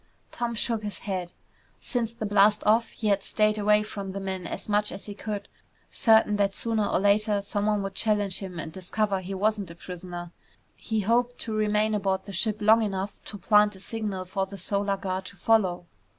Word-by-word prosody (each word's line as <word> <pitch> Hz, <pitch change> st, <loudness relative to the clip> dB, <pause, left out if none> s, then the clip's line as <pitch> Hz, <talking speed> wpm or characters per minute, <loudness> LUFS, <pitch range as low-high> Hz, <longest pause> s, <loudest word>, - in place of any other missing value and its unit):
Tom 235 Hz, -1 st, -3 dB
shook 225 Hz, 0 st, 0 dB
his 210 Hz, -1 st, -5 dB
head. 185 Hz, -4 st, -4 dB, 0.5 s
Since 235 Hz, -3 st, -2 dB
the 220 Hz, -, -5 dB
blast 205 Hz, 0 st, +4 dB
off 225 Hz, +2 st, +4 dB
he 215 Hz, -, -2 dB
had 200 Hz, -1 st, +3 dB
stayed 215 Hz, +1 st, +1 dB
away 210 Hz, 0 st, +4 dB
from 200 Hz, -2 st, -6 dB
the 195 Hz, -, -4 dB
men 190 Hz, -2 st, -4 dB
as 195 Hz, -, -5 dB
much 210 Hz, 0 st, +2 dB
as 195 Hz, -, -7 dB
he 205 Hz, -, -6 dB
could, 205 Hz, 0 st, -5 dB, 0.4 s
certain 220 Hz, -2 st, +4 dB
that 200 Hz, -1 st, +1 dB
sooner 225 Hz, -3 st, 0 dB
or -, -, +1 dB
later 205 Hz, +1 st, +3 dB
someone 205 Hz, 0 st, 0 dB
would 195 Hz, 0 st, -4 dB
challenge 205 Hz, -3 st, +1 dB
him 185 Hz, -3 st, -7 dB
and 160 Hz, -1 st, -5 dB
discover 195 Hz, +3 st, -1 dB
he 190 Hz, +1 st, -5 dB
wasn't 205 Hz, -1 st, 0 dB
a 170 Hz, -, -10 dB
prisoner. 175 Hz, -1 st, -8 dB, 0.4 s
He 220 Hz, -2 st, -2 dB
hoped 240 Hz, +4 st, +1 dB
to 220 Hz, -, -3 dB
remain 215 Hz, 0 st, +1 dB
aboard 195 Hz, -2 st, 0 dB
the 200 Hz, -, -8 dB
ship 210 Hz, +3 st, +1 dB
long 220 Hz, +2 st, +6 dB
enough 200 Hz, -1 st, -2 dB
to 205 Hz, -, -7 dB
plant 210 Hz, +1 st, +4 dB
a -, -, -13 dB
signal 205 Hz, -3 st, -4 dB
for 190 Hz, +1 st, -2 dB
the 200 Hz, +1 st, -9 dB
Solar 200 Hz, +2 st, -1 dB
Guard 190 Hz, -1 st, -3 dB
to 195 Hz, -, -9 dB
follow. 190 Hz, -6 st, +2 dB
205 Hz, 200 wpm, -27 LUFS, 190-215 Hz, 0.5 s, long